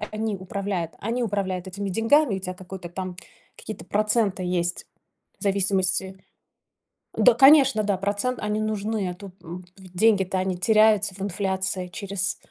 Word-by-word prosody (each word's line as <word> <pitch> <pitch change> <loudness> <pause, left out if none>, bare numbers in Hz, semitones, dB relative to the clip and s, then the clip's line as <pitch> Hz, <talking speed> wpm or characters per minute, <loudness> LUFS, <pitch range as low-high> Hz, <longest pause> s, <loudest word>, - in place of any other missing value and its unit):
э, 210 - -3
они 215 -1 -2
управляют. 190 -2 -4
Они 235 +4 -2
управляют 190 -4 -2
этими 195 +1 -4
деньгами, 225 +3 +3
у - - -3
тя 185 -1 -5
какой-то 180 -1 -9
там, 185 +1 -6 0.4
какие-то 215 - -8
проценты 210 -2 0
есть 175 -1 -2 0.5
в - - -9
зависимости 190 -1 0 0.9
Да, 250 - +6
конечно, 270 -2 +6
да, 200 -2 0
процент- 205 +6 -1
они 210 0 -1
нужны, 215 -2 -2
а 180 - -6
тут 195 0 -11
м, 175 +2 -9
в 185 -2 -14
деньги-то, 195 -3 +3
они 185 -1 -1
теряются 215 0 +3
в 190 - -11
инфляции 190 -1 -2
через 195 +1 -3
195 Hz, 155 wpm, -24 LUFS, 185-215 Hz, 0.9 s, Да